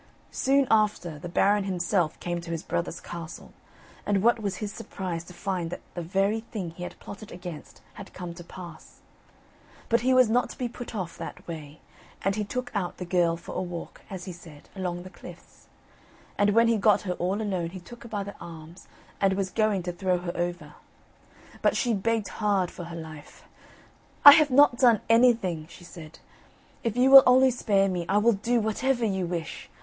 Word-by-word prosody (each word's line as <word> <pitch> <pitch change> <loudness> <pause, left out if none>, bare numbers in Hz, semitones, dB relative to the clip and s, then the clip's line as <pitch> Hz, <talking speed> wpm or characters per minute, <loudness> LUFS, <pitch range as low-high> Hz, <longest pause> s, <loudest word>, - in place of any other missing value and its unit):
Soon 275 0 +2
after, 210 -8 +1
the 175 - -7
Baron 200 +3 +2
himself 180 -3 0
came 175 0 -3
to 170 - -10
his 165 -1 -3
brother's 170 -1 -3
castle, 170 -1 -9 0.5
and 200 -1 0
what 235 0 +4
was 200 -3 -2
his 205 +2 -5
surprise 175 -4 -5
to 180 - -12
find 180 -2 -3
that - - -6
the 175 - -4
very 195 +5 0
thing 210 -6 -6
he 170 - -13
had 180 - -6
plotted 205 +1 -10
against 175 -4 -9
had 200 -3 -11
come 175 -2 -7
to 175 0 -11
pass. 170 -2 -12 0.9
But 230 0 +3
he 255 +2 +2
was 255 -2 +6
not 240 +3 +1
to - - -10
be 250 - -2
put 240 -1 -8
off 185 -5 -5
that - - -8
way; 155 -3 -8 0.4
and 195 +1 +1
he 215 - -1
took 245 +4 -4
out 195 -4 -2
the 180 - -5
girl 170 -2 +2
for - - -9
a - - -2
walk, 175 -2 -7
as 185 -2 -7
he 185 - -6
said, 165 -4 -14
along 180 -2 -3
the 185 - -11
cliffs. - - -14 0.7
And 205 0 +3
when 230 0 +5
he 230 -1 +3
got 210 0 +4
her 180 -3 -2
all 185 +3 -2
alone, 185 -6 -2
he 185 +2 -8
took 235 +8 -13
her 235 - -10
by 205 -2 -3
the 200 0 -8
arms, 165 +1 -11 0.3
and 195 -1 +3
was 190 -1 -2
going 215 -2 +1
to 180 - -3
throw 185 0 0
her 175 -1 -5
over. 175 -4 -3 0.9
But - - +2
she 240 -2 +1
begged 220 +1 0
hard 200 -4 +1
for 175 - -8
her 170 0 -8
life. 155 -2 -11 0.8
"I 285 - +15
have 300 0 +6
not 260 -2 +5
done 235 -5 +5
anything," 230 -9 +3
she 175 - -14
said: 165 -2 -11 0.7
"if 230 -1 -2
you 260 +2 +4
will 270 0 +13
only 260 +1 +6
spare 200 -5 +2
me, 175 -3 -3
I 200 - +3
will 230 +3 +4
do 235 +4 0
whatever 235 +3 0
you 190 -4 -1
wish. 170 -3 -5
190 Hz, 200 wpm, -27 LUFS, 175-220 Hz, 0.9 s, I